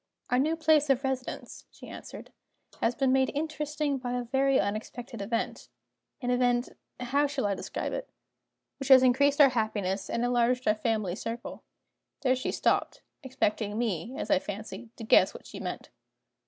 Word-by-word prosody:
"Our 250 - +4
new 310 +4 +2
place 310 -2 +3
of 270 0 +3
residence," 265 -1 -4
she - - -13
answered, - - -10 0.5
"has 230 +1 +1
been 265 -2 +2
made 265 0 +3
interesting 300 -2 -2
by 245 -1 -4
a 250 0 -1
very 270 +2 +2
unexpected 230 +3 -4
event 225 +3 -3 0.5
an 245 - 0
event 245 0 +2 0.3
(how 275 +4 +1
shall 280 -5 -2
I 200 - +1
describe - - -4
it?) - - -4 0.7
which 275 - -4
has 260 -1 +8
increased 280 +3 +4
our 285 -2 +9
happiness 210 -5 -1
and 235 +1 0
enlarged 245 +1 +1
our 210 - +5
family 215 -4 -1
circle." 230 +3 -6 0.6
There 255 -1 +3
she 255 - -2
stopped: - - 0 0.2
expecting 215 -5 -1
me, 230 +1 -2
as - - -3
I 290 - +5
fancied, 220 +1 -7
to 230 - -7
guess 220 - +5
what - - -11
she - - -9
meant. - - -6
250 Hz, 165 wpm, -29 LUFS, 230-275 Hz, 0.7 s, our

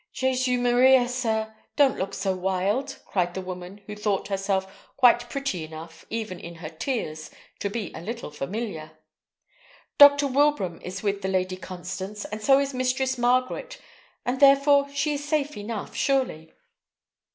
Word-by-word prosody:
"Jesu 255 -1 +1
Maria, 245 +1 +5
sir! 220 -3 -1 0.2
don't 280 -3 +3
look 190 +1 -3
so 190 -1 -1
wild," 195 +9 -1
cried 175 -2 -1
the 190 - -3
woman, 185 +2 -8
who 210 - -7
thought 210 -1 -1
herself 195 -1 -2
quite 240 -2 +5
pretty 275 - -3
enough, 160 +1 -10
even 220 -6 -4
in 170 0 -9
her 165 - -7
tears, 155 - -4 0.3
to 200 - -2
be 205 -2 -4
a 160 - -7
little 230 -2 -6
familiar. 155 -1 -5 1.0
"Dr. 285 0 +9
Wilbraham 275 - +1
is 185 +3 -6
with 200 -1 -1
the 190 - -2
Lady 185 -1 0
Constance, 190 +3 -6
and 215 +1 -6
so 270 +4 +5
is 275 0 0
Mistress 255 0 0
Margaret, 255 - 0 0.5
and 250 +2 -1
therefore 280 0 +5
she 280 +2 -1
is 290 0 -4
safe 295 0 -1
enough, 210 0 -6
surely." 260 - 0
220 Hz, 150 wpm, -25 LUFS, 185-265 Hz, 1.0 s, Dr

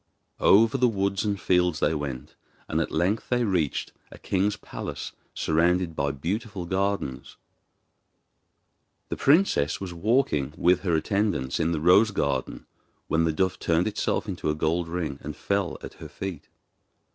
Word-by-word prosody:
Over 115 +6 +5
the 125 - +5
woods 100 -3 0
and 100 -2 -1
fields 90 -3 +2
they - - +2
went, 70 -2 -5 0.3
and - - 0
at - - -2
length 90 +7 0
they 125 -1 +2
reached 90 -9 0 0.2
a - - -11
king's 100 +2 0
palace - - -6 0.2
surrounded 85 +1 +1
by 70 -1 0
beautiful 95 - -4
gardens. 95 -7 -2 1.7
The - - -2
princess 140 - +3
was 95 -3 -6
walking 85 - +1
with 90 +1 +4
her 90 -4 0
attendants 100 -6 0
in 80 0 +1
the 80 - -1
rose 90 +7 +5
garden 70 -10 -2 0.4
when 80 +1 +2
the 80 - +2
dove 95 +3 0
turned 85 +3 +1
itself 110 +1 -1
into 90 -5 -3
a 75 - +1
gold 80 +2 0
ring 80 -5 -3
and - - -6
fell 100 -3 -1
at - - -8
her - - -10
feet. 95 -3 -7
90 Hz, 155 wpm, -26 LUFS, 80-100 Hz, 1.7 s, Over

